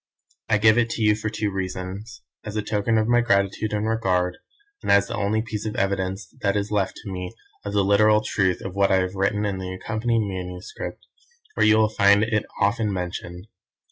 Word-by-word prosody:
I 110 - +4
give 110 +2 +5
it 115 -1 +1
to 115 - -2
you 105 0 +4
for 110 0 -3
two 110 -1 -2
reasons; 95 +3 -5 0.2
as 105 0 -7
a 105 - -1
token 105 +2 0
of 110 0 +2
my 120 0 +4
gratitude 100 -1 +1
and 105 +1 -1
regard, 90 -5 0 0.4
and - - 0
as 100 0 +5
the - - -6
only 110 +2 0
piece 110 -2 -5
of 105 - -4
evidence 95 0 -2
that 100 -1 +1
is 100 +1 -2
left 100 -3 0
to 100 - -6
me 90 +3 -6 0.3
of 100 - -5
the 100 -1 +3
literal 105 +2 +4
truth 95 -4 0
of 95 - -6
what 100 0 +2
I - - +5
have 95 0 0
written 100 +2 0
in 100 -2 -2
the 95 0 -5
accompanying 110 +3 -1
manuscript, 90 0 -6 0.5
where - - +3
you 110 0 +6
will 110 0 +4
find 100 -1 +4
it 110 -1 0
often 105 +1 +1
mentioned. 90 -1 -5
100 Hz, 205 wpm, -24 LUFS, 95-110 Hz, 0.5 s, you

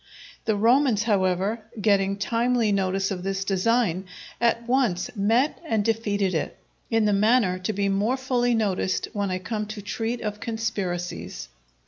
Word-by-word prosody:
The 220 -2 +2
Romans, 235 +1 +3
however, 195 +1 +1 0.2
getting 200 -1 +2
timely 230 +1 +1
notice 195 0 0
of 185 -2 -3
this 195 +1 -2
design, 195 -1 +1 0.4
at 235 0 +1
once 245 -6 +1
met 225 +8 +2
and 220 -10 0
defeated 205 -4 0
it, 160 - -2 0.3
in 225 -2 +2
the 210 - +3
manner 205 -2 +3
to 185 +3 -2
be 200 -1 0
more 205 +6 +1
fully 245 -2 +1
noticed 195 -4 0
when 205 -2 -1
I 185 - -1
come 210 +3 -4
to 215 0 -6
treat 225 +3 -3
of 210 -1 -4
conspiracies. 200 -6 -4
210 Hz, 150 wpm, -25 LUFS, 195-230 Hz, 0.4 s, Romans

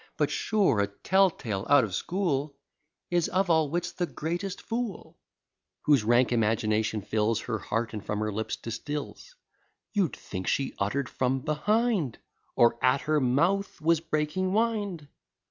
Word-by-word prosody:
But - - +1
sure 200 - +2
a 100 - +2
tell 190 - +3
tale 105 - -4
out 145 -2 +6
of 105 -5 -4
school 150 - -1 0.6
Is 175 -2 +2
of 185 0 +1
all 160 -3 +3
wits 175 +3 -2
the 175 - -2
greatest 175 +5 -4
fool; 230 -5 -5 0.6
Whose 145 -7 +4
rank 120 +3 +3
imagination 110 -2 +1
fills 110 +2 0
Her 110 -3 -3
heart, 115 +3 -2
and 105 -3 -5
from 105 - -3
her 110 0 -1
lips 110 +2 -2
distils; 145 - -6 0.6
You'd 195 -7 +1
think 95 -1 -6
she 135 -1 0
utter'd 125 +7 0
from 130 +1 -1
behind, 180 - +1 0.4
Or 120 0 +3
at 130 +2 +4
her 155 0 +1
mouth 170 +11 +1
was 165 +1 +3
breaking 160 +4 -1
wind. 205 -8 0
145 Hz, 150 wpm, -28 LUFS, 115-180 Hz, 0.6 s, out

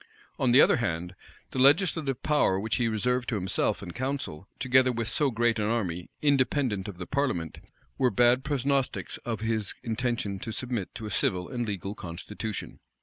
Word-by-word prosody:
On 125 - +3
the 130 +4 +8
other - - +5
hand, 90 -6 -2 0.4
the 130 - -3
legislative 140 -1 +3
power 145 -11 +3
which 110 +2 -1
he 120 -2 +1
reserved 120 +3 0
to 115 - -1
himself 100 +1 0
and 85 -3 -7
council, 130 - -4
together 130 0 +4
with 115 -2 -2
so 145 +3 +2
great 120 -1 +1
an 105 - +1
army, 95 -6 -2
independent 130 -7 +2
of 100 -4 -7
the 90 - -5
parliament, 125 - -1 0.4
were 130 -2 +4
bad 120 +1 +4
prognostics 140 -1 -1
of 115 -3 -4
his 110 -3 0
intention 115 -4 -2
to 110 - -5
submit 120 -4 -4
to 110 - -6
a 105 - -5
civil 90 -1 0
and 120 -2 -3
legal 100 -1 -3
constitution. 105 +4 -6
115 Hz, 175 wpm, -28 LUFS, 100-130 Hz, 0.4 s, the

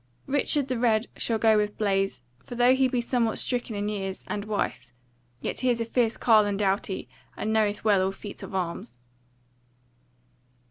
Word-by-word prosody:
Richard 285 0 +1
the 255 -3 -2
Red 225 -2 +2
shall 230 - 0
go 220 -1 +4
with 210 0 -1
Blaise; 195 - 0 0.2
for 245 - -9
though 245 +1 +5
he 265 0 +3
be 250 -1 0
somewhat 235 -2 0
stricken 245 -3 -2
in 205 0 -2
years, 195 -2 -4
and 205 0 -3
wise, 125 - -3 0.5
yet - - -3
is 245 -2 +3
he - - +1
a - - -9
fierce 230 -1 +1
carle 215 -3 +5
and 200 0 -2
a - - +1
doughty, 195 0 -1 0.3
and 220 +1 -1
knoweth 210 -2 +1
well 205 -3 +4
all 190 +1 +1
feats 200 +1 -8
of - - -7
arms. 170 -10 -4
215 Hz, 185 wpm, -26 LUFS, 195-240 Hz, 0.5 s, though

